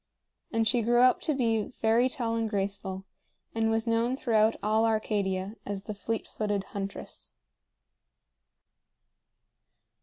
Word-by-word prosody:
And 225 -1 +2
she 240 +2 +2
grew 240 +2 +3
up 255 0 +5
to 305 - 0
be 225 -5 +1
very 230 +3 +3
tall 235 -3 -2
and 225 -1 0
graceful, 195 -2 -3 0.5
and 225 0 +1
was 225 0 +1
known 230 +2 +1
throughout 220 -3 +3
all 215 +1 +3
Arcadia 205 -2 0
as 200 -1 -4
the 215 - -5
fleet 225 +2 -3
footed 205 -2 -2
huntress. 200 -1 -6
220 Hz, 125 wpm, -29 LUFS, 205-230 Hz, 0.5 s, up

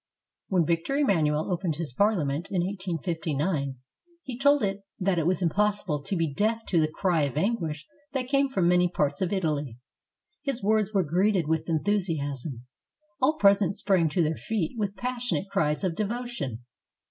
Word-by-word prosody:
When 180 -4 +2
Victor 165 - 0
Emmanuel 160 - +2
opened 175 -3 -1
his 160 -5 -4
Parliament 165 - +1
in 180 -3 0
1859, 165 -6 -2 0.5
^^ 245 -1 -5
told 285 -1 +5
it 195 0 -1 0.2
that 185 -2 +1
it 165 - 0
was 185 0 +1
impossible 195 -4 +1
to 190 - -3
be 165 -4 0
deaf 220 +7 0
to 170 -3 +3
the 155 - +3
cry 165 +1 0
of 140 0 -4
anguish 160 -6 -1 0.3
that 260 -2 -1
came 275 +1 +2
from 190 -10 +1
many 180 0 +4
parts 145 -3 -1
of 185 - 0
Italy. 150 - -1 0.6
His 275 -6 -3
words 215 0 +2
were 195 -3 +2
greeted 180 +2 +1
with 160 +1 -1
enthusiasm. 155 - -1 0.6
All 270 +4 +4
present 200 - +4
sprang 185 -5 +2
to 170 +3 +1
their 155 0 0
feet 215 -3 -2
with 205 -3 -2
passionate 240 -7 -2
cries 150 -7 +1
of 185 -3 +1
devotion. 210 - -4
180 Hz, 165 wpm, -27 LUFS, 155-205 Hz, 0.6 s, told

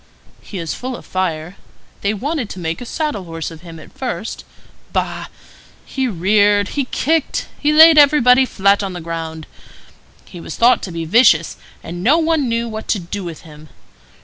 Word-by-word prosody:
He 200 - -9
is 165 -4 -4
full 255 0 -5
of - - -11
fire. 175 -1 -3 0.4
They 200 - +1
wanted 255 +2 -3
to 185 - -8
make 165 +2 -4
a 245 - -7
saddle 295 - -3
horse 165 -1 -6
of 160 -1 -12
him 165 -2 -11
at - - -15
first. 245 -3 -5 0.5
Bah! - - -2 0.6
He 265 -1 -2
reared, 205 +1 +2
he 280 -2 -2
kicked, 315 +4 -1
he 295 - +2
laid 315 0 +8
everybody 265 -3 +5
flat 200 -1 +2
on 195 -2 -4
the 175 - -6
ground. 160 -1 -6 0.8
He 175 -2 -11
was - - -7
thought 240 +2 +4
to 185 - -8
be 165 -1 -4
vicious, 175 -4 +4 0.3
and 175 +2 -7
no 280 +9 +4
one 320 -5 +1
knew 230 0 -1
what 220 -1 -7
to - - +1
do 190 +2 -6
with 170 -3 -7
him. 155 -1 -14
205 Hz, 180 wpm, -18 LUFS, 170-255 Hz, 0.8 s, laid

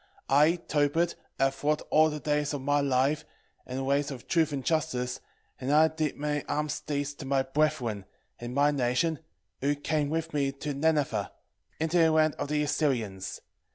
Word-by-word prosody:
1:3 - - +5
I 150 +4 +5
Tobit 155 +4 +1 0.2
have 135 0 +1
walked 150 +1 +1
all 155 +1 +5
the 150 0 -4
days 150 0 0
of 140 - -4
my 145 +2 +2
life 140 +2 +1 0.4
in 130 - -4
the 135 - -2
ways 140 +1 +1
of 130 -4 -8
truth 165 -4 +2
and 135 -3 -4
justice, 125 -6 -1 0.4
and 130 +2 -2
I 155 +2 +6
did 155 -2 -2
many 150 0 -1
almsdeeds 145 -1 -2
to 140 - -6
my 135 -1 +2
brethren, 135 -8 0 0.3
and 120 +1 -6
my 145 +1 +4
nation, 140 +4 0 0.4
who 145 +2 +1
came 145 0 -1
with 165 +1 -2
me 140 -2 0
to 145 +2 -4
Nineve, 140 -8 +1 0.5
into 160 +2 +1
the 165 -1 +6
land 155 -1 +3
of - - -2
the 150 0 +1
Assyrians. 115 -11 -1
145 Hz, 180 wpm, -28 LUFS, 135-155 Hz, 0.5 s, I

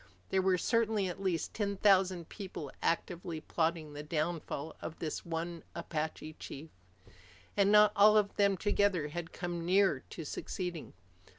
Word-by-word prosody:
There 190 - +2
were 185 -1 +3
certainly 220 0 +1
at 180 - -6
least 180 -4 -1
ten 200 -2 -1
thousand 185 -4 +3
people 185 -8 -7
actively 170 -1 -1
plotting 160 -1 -1
the 145 - -6
downfall 155 -1 -3
of 160 - -6
this 155 - -4
one 170 0 -4
Apache 155 -1 -4
chief. 155 +3 -8 0.8
And 200 0 +4
not 210 0 +7
all 210 +1 +7
of 205 -1 +2
them 200 -1 +3
together 200 -5 +1
had 170 +2 -5
come 175 -1 -4
near 185 -3 +3
to 165 - -7
succeeding. 175 +2 -5
175 Hz, 150 wpm, -33 LUFS, 160-200 Hz, 0.8 s, not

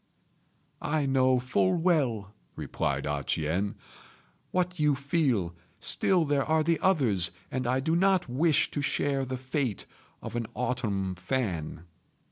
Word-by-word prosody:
"I 150 -1 0
know 130 -1 +3
full 110 -7 +1
well," 135 - +1 0.2
replied 70 0 -2
A 75 -1 -2
ch'ien, 85 +9 -1 0.7
"what 180 -1 -1
you 150 -2 +3
feel; 135 - 0 0.3
still 180 -4 +3
there 145 -2 +1
are 160 +1 +2
the 165 +1 +1
others, 120 - +2 0.2
and 130 -1 -2
I 130 +2 +2
do 160 +4 +1
not 190 0 +3
wish 145 +5 +2
to 145 - -2
share 140 -1 0
the 130 0 -4
fate 130 -3 -2 0.4
of - - -6
an 120 -2 -2
autumn 115 -7 -1
fan." 90 - -3
130 Hz, 135 wpm, -28 LUFS, 100-155 Hz, 0.7 s, know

